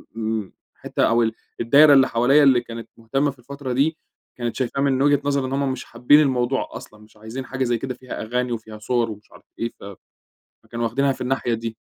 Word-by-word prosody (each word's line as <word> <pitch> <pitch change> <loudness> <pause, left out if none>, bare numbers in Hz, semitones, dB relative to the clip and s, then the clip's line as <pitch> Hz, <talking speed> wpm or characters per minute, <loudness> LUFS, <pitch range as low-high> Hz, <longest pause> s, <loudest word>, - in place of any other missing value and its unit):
م - - -7 0.2
م 100 -3 -9 0.2
حتّة - - -2
أو 115 +1 +3
ال 110 -1 0 0.3
الدايرة 145 +6 +7
اللي 135 -1 +6
حواليَّ 130 +6 +4
اللي 130 -3 +5
كانت 115 -1 -9
مهتمة 135 +6 0
في 135 - -20
الفترة 135 +1 -6
دي، 150 +5 +1 0.4
كانت 120 -2 -3
شايفاه 130 +2 -2
مِن 135 -2 +2
وجهة 145 0 +3
نظر 140 -2 +1
إن 130 - -4
هم 140 -1 0
مش 130 - -6
حابين 125 +5 +4
الموضوع 130 -3 +1
أصلًا، 105 - -11
مش 105 0 -20
عايزين 110 +5 -7
حاجة 135 0 -3
زي 120 -2 +1
كده 130 +2 -4
فيها 125 +1 -8
أغاني 125 +2 -2
وفيها 110 -2 -6
صور 115 +1 0
ومش 105 0 -12
عارف - - -17 0.2
إيه. 115 0 -2
فَ - - -14 0.8
فكانوا 120 0 -4
واخدينها 135 +4 +1
في - - -6
الناحية 125 -1 -1
دي. 115 0 -4
125 Hz, 215 wpm, -22 LUFS, 115-135 Hz, 0.8 s, الدايرة